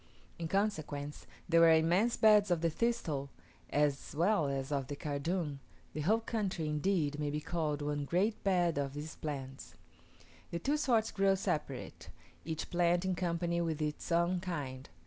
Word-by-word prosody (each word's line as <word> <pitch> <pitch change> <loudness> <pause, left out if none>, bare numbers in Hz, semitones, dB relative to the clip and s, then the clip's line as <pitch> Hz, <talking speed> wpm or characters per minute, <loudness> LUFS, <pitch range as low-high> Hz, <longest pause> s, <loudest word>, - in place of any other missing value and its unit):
In 165 - -2
consequence, 155 -7 -2 0.2
there 165 -1 +5
were 165 -1 +8
immense 175 +9 +3
beds 210 -2 +6
of 175 -2 +1
the 165 -1 +1
thistle, 160 -11 -1 0.4
as 145 -1 0
well 170 -1 +2
as 135 0 -3
of 140 -3 -1
the 145 - -4
cardoon: 150 +1 -2 0.3
the 155 - -3
whole 215 +9 +2
country, 200 -8 -2
indeed, 150 -1 0
may 150 -1 -1
be 150 +1 -2
called 155 -2 -2
one 145 0 -2
great 195 +8 0
bed 175 -6 +2
of 140 0 -3
these 150 +2 -5
plants. 135 -3 -6 0.7
The 170 - -3
two 280 - 0
sorts 235 -7 +2
grow 195 -1 +3
separate, 160 -8 -3 0.3
each 160 0 -4
plant 175 0 +2
in 190 - +1
company 170 -1 -1
with 160 -2 -1
its 150 +2 -3
own 170 +2 +2
kind. 145 -8 -5
165 Hz, 165 wpm, -33 LUFS, 145-185 Hz, 0.7 s, were